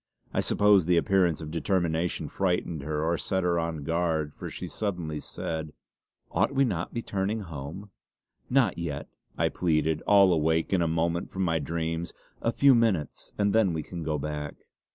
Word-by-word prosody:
I - - +1
suppose 100 -4 +4
the 90 -1 +4
appearance 90 -3 +2
of 75 -1 -6
determination 85 0 0
frightened 90 -4 -1
her 75 +1 -2
or 85 +1 +1
set 95 -1 -1
her 85 -1 +2
on 80 -3 -3
guard, 80 -2 0
for - - -7
she - - -6
suddenly 90 -8 -3
said: 80 -1 -5 0.6
"Ought 140 - +1
we 135 0 +4
not 90 -7 -1
to - - -23
be 115 - -1
turning 100 +3 -1
home?" 85 +4 -7 0.6
"Not 130 -7 +2
yet!" 75 -4 -4 0.3
I - - +2
pleaded, 80 -2 +1
all 100 -3 +6
awake 80 +2 +1
in 90 - +3
a 85 - +2
moment 85 +2 0
from 95 - -2
my 80 -2 +1
dreams. 80 +2 -3 0.3
"A 115 - +1
few 140 +2 +5
minutes, 110 - 0
and 100 -1 +2
then 110 -6 +3
we 80 -1 -2
can 85 -2 -7
go 75 -1 -1
back." 75 0 -4
85 Hz, 180 wpm, -28 LUFS, 80-95 Hz, 0.6 s, all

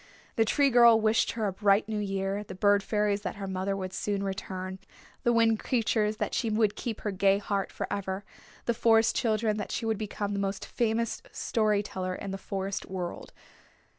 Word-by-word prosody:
The 225 - +3
Tree 280 +4 +3
Girl 235 -2 +7
wished 220 0 +2
her 225 -2 -2
a 195 - -1
bright 200 +1 +3
new 215 -1 -2
year, 195 0 -2
the 190 -2 -9
Bird 205 +1 +4
Fairies 210 -1 0
that 185 -3 -4
her 200 -1 -5
mother 190 +1 -2
would 185 -1 -5
soon 200 0 -2
return, 190 -1 -4 0.4
the 240 - +2
Wind 225 -2 +3
Creatures 215 -3 +1
that - - -2
she 230 - 0
would 215 -1 +2
keep 230 -4 -4
her 210 - -2
gay 195 +1 +3
heart 200 -1 -2
forever, 195 0 -4 0.4
the 235 - +2
Forest 225 0 +4
Children 220 -3 +1
that 205 - -4
she 230 - -2
would 220 -2 0
become 205 -1 -3
the 200 - -1
most 195 0 -2
famous 230 -1 -1
story 215 -2 +1
teller 185 -2 -4
in 195 - -6
the 195 - -5
Forest 195 0 -4
World. 180 -2 -5
205 Hz, 195 wpm, -29 LUFS, 195-220 Hz, 0.4 s, Girl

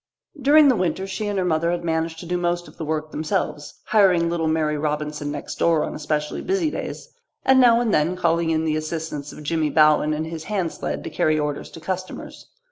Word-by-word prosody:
During 290 +3 +6
the 260 - +5
winter 180 -1 -1
she 195 +2 -4
and 205 -1 -2
her 185 - +1
mother 165 -1 +1
had 175 0 -2
managed 160 0 -1
to - - -9
do 175 +1 -2
most 175 0 -1
of - - -16
the - - -5
work 155 0 -3
themselves, 150 -1 -3
hiring 180 -6 +3
little 165 -2 0
Mary 155 -1 +1
Robinson 150 0 -2
next 145 -1 -6
door 165 -2 +3
on - - -4
especially 150 0 -2
busy 365 -5 0
days, - - -6 0.4
and 265 0 +6
now 235 -2 +6
and 235 -3 0
then 155 +4 +2
calling 170 -2 +1
in 160 0 +1
the 155 -1 +1
assistance 155 -2 -4
of 150 - -11
Jimmy 155 0 0
Bowen 155 0 +4
and 155 +1 -3
his 160 -1 -7
hand 190 -6 -1
sled - - -4
to - - -6
carry 155 0 +1
orders 150 -1 -3
to - - -11
customers. 185 +2 -6
165 Hz, 215 wpm, -23 LUFS, 155-185 Hz, 0.4 s, During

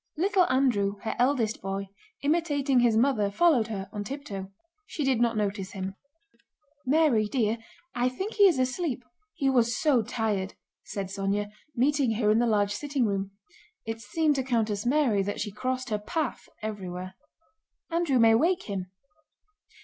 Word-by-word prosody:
Little 375 +2 +3
Andrew, 230 -7 +2
her 225 - -2
eldest 245 -4 +1
boy, 195 0 -4 0.3
imitating 285 -4 +2
his 235 -2 +4
mother, 225 -5 +2
followed 250 0 +3
her 200 -3 -5
on 205 -1 -3
tiptoe. 205 -6 -6 0.4
She 305 - -3
did 265 -4 +2
not 235 -2 +2
notice 200 -2 -2
him. 190 0 -4 0.9
"Mary, 275 -7 +3
dear, 225 -1 0 0.3
I 245 +1 +1
think 380 - -5
he 405 -2 +6
is 340 -7 +3
asleep—he 260 - -2
was 240 -2 +2
so 285 -7 +3
tired," 210 -3 -2 0.3
said 195 -2 -5
Sónya, 200 +1 -2 0.2
meeting 270 -1 +2
her 210 -1 +2
in 220 - +4
the 240 - +2
large 205 -2 +2
sitting 280 +2 -1
room 195 -2 -1 0.6
(it 225 0 -4
seemed 300 +8 +1
to 265 - 0
Countess 225 -4 0
Mary 250 -7 +3
that 205 +1 -3
she 210 -1 -3
crossed 255 +3 -3
her 210 - 0
path 310 +6 -3
everywhere). 185 -3 -5 0.8
"Andrew 330 -5 +2
may 225 -1 +6
wake 345 +10 +2
him." 190 -3 -4
235 Hz, 155 wpm, -27 LUFS, 205-275 Hz, 0.9 s, he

